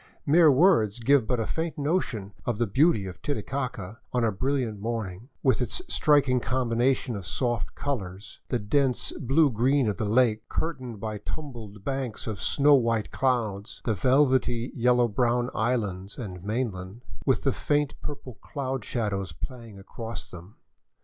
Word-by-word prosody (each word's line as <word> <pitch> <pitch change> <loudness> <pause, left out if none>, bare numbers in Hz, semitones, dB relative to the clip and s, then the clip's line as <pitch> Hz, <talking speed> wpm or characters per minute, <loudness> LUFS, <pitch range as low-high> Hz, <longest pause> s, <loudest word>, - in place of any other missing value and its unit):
Mere 155 +1 +6
words 130 - +4
give 125 -1 +3
but 125 -2 0
a 110 - 0
faint 165 +4 -3
notion 140 - -1
of 120 -4 -1
the 120 - +2
beauty 115 - +3
of 95 -1 -8
Titicaca 120 -5 -3
on 125 -1 +1
a 115 - +3
brilliant 120 0 -1
morn 110 -2 -2
ing, 110 +9 -14
with 130 -3 +3
its 125 - -1
striking 140 - +3
combinations 125 0 0
of 95 -4 -6
soft 120 -3 -1
colors, 100 -8 -4
— - - -45
the 125 - +1
dense 125 +4 +1
blue 140 +3 +2
green 130 +3 +2
of 105 -4 -1
the 105 - -1
lake, 115 -1 +2
curtained 130 -9 -3
by 105 0 -4
tumbled 110 -6 -7
banks 135 -2 -3
of 110 -4 -4
snow 145 +1 +4
white 115 -5 +2
clouds, 115 -6 -1
the 115 - +2
velvety 130 - +2
yellow 125 -1 +3
brown 120 +2 +1
islands 105 -5 -1
and 90 -7 -7
mainland, 105 -1 -3 0.2
with 130 - +2
the 135 - +2
faint 145 -1 0
purple 140 -4 -7
cloud 135 -4 -4
shadows 100 -6 -2
playing 115 - -8
across 115 +4 -7
them. 90 +3 -11
120 Hz, 160 wpm, -27 LUFS, 105-135 Hz, 0.2 s, Mere